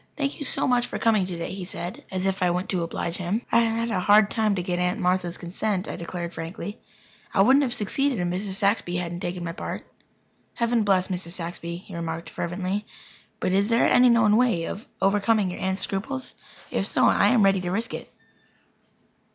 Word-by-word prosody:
"Thank 280 -2 -2
you 290 - -3
so - - +3
much 245 -1 +2
for - - -4
coming 215 -5 +2
today," 170 -1 -4
he 190 -1 -5
said 175 0 -6
as 185 0 -2
if 190 0 0
I 180 - +3
went 180 +2 -2
to 185 -3 0
oblige 165 0 -3
him. 195 +6 -2
"I - - +5
had 230 0 0
a 190 - +1
hard 205 +2 +5
time 215 -3 +2
to 180 - -2
get 175 -1 -2
Aunt 180 0 0
Martha's 180 -1 0
consent," 185 +2 -2
I - - -4
declared 170 0 -5
frankly. 170 +5 -6 0.6
"I 195 - +5
wouldn't 265 +6 +5
have 265 -4 0
succeeded 245 +3 0
if 175 - 0
Mrs. 190 +3 -2
Saxby 200 -3 +1
hadn't 175 -1 -3
taken 175 -1 -4
my 165 - -3
part." 170 - -6 0.7
"Heaven 235 0 +1
bless 190 -2 +2
Mrs. 180 -2 -4
Saxby," 170 -1 -5
he 185 +2 -13
remarked 165 0 -4
fervently. 185 +4 -3 0.5
"But - - 0
is 200 +3 +2
there 230 0 +4
any 250 0 +6
known 225 -3 +5
way 230 -9 +2
of 210 - -6 0.2
overcoming 205 0 +2
your - - -7
aunt's 190 +1 0
scruples? 260 +7 -3 0.4
If - - 0
so, - - +2
I - - +5
am 240 -5 +4
ready 195 -1 +3
to 180 - -3
risk 220 +6 -2
it." - - -7
190 Hz, 205 wpm, -25 LUFS, 175-220 Hz, 0.7 s, any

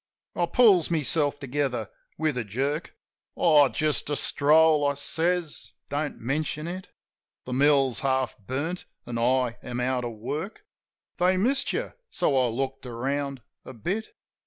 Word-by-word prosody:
I - - +1
pulls 205 -10 +5
meself 150 -2 +1
together 140 - -2 0.3
with 155 -3 0
a 125 - -1
jerk. 135 - -3 0.4
"Oh, 150 -5 +5
just 155 0 -1
a 145 - 0
stroll," 150 +1 +4
I 140 - 0
says. 165 +3 -1 0.2
"Don't 145 +1 -2
mention 150 +5 -2
it. 185 +2 -6 0.6
The 125 - -4
mill's 135 -3 +3
half 130 -1 0
burnt, 140 - -4 0.2
an' 120 -1 -4
I 125 0 +1
am 125 -1 -5
out 125 0 0
of 120 -1 -4
work; 150 - -5 0.5
They 185 +1 +3
missed 265 +8 +2
you, - - -3 0.2
so 160 -6 +1
I 130 -1 +3
looked 135 +2 -3
around 135 +2 -3 0.2
a 130 - -10
bit." 190 - -4
145 Hz, 145 wpm, -26 LUFS, 130-160 Hz, 0.6 s, pulls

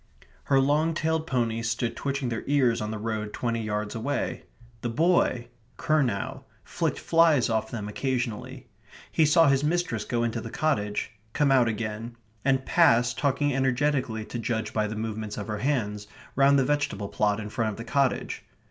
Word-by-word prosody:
Her 135 -1 +4
long 150 +4 +2
tailed 160 0 0
ponies 115 -4 0
stood 115 +1 -1
twitching 140 -2 -2
their 115 -1 -3
ears 130 -5 +2
on 105 - -3
the 110 - -3
road 110 -1 -3
twenty 115 -1 -1
yards 105 -1 -3
away. 130 +5 -3 0.4
The 120 - -2
boy, 130 -3 +2 0.3
Curnow, 135 -3 0 0.2
flicked 165 -2 -2
flies 165 -8 +3
off 110 0 0
them 105 -3 -5
occasionally. 125 +2 -3 0.5
He 160 -2 +3
saw 165 +1 +5
his 140 0 +3
mistress 155 -8 0
go 120 +1 -1
into 115 -1 -1
the 115 - -7
cottage; 105 -9 -1 0.2
come 145 -2 +2
out 130 -3 +5
again; 115 +1 -4 0.3
and 135 -1 +2
pass, 125 -8 +4
talking 145 +2 0
energetically 130 -3 0
to 120 - -5
judge 110 -1 -2
by 110 -1 +1
the 110 - -5
movements 110 -1 -4
of 105 - -4
her 105 -1 -4
hands, 105 -6 -1 0.3
round 140 0 +5
the 135 - +3
vegetable 145 -8 -1
plot 105 0 +1
in 105 -1 -6
front 110 -1 0
of 105 - -6
the 115 - -6
cottage. 135 +2 0
120 Hz, 175 wpm, -27 LUFS, 110-140 Hz, 0.5 s, saw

